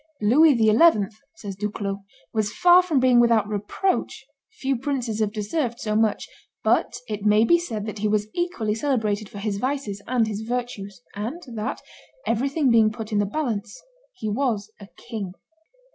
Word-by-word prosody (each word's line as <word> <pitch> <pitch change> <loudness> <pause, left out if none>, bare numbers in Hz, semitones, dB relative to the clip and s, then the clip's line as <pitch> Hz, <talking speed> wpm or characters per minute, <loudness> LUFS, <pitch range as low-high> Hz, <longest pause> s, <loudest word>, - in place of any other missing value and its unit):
"Louis 270 +7 +5
XI.," 220 - +4 0.2
says 205 -3 -7
Duclos, 200 0 -3 0.3
"was 215 -2 0
far 355 +6 +6
from 335 -7 +1
being 255 -1 +5
without 230 -3 +4
reproach; 210 - -2 0.2
few 275 -11 -2
princes 245 -4 -2
have 215 -2 +1
deserved 235 +4 -2
so 215 -1 -2
much; 220 -1 +1 0.4
but - - +2
it 210 -2 -4
may 210 +1 +5
be 340 +7 +5
said 220 -12 -4
that 215 -1 -6
he 215 - +1
was 210 0 +1
equally 345 -12 -1
celebrated 220 -5 -1
for - - -10
his 200 0 -2
vices 255 -6 -2
and 245 -2 +2
his 215 -1 -4
virtues, 220 -6 -5
and 225 +11 -4
that, 215 -1 -4 0.4
everything 270 +4 +1
being 225 -2 +5
put 220 0 -7
in 210 - +1
the 205 - +1
balance, 225 -5 -3 0.3
he 220 - -6
was 220 -2 -1
a 200 - -11
king." 210 -6 -6
220 Hz, 165 wpm, -24 LUFS, 210-255 Hz, 0.4 s, far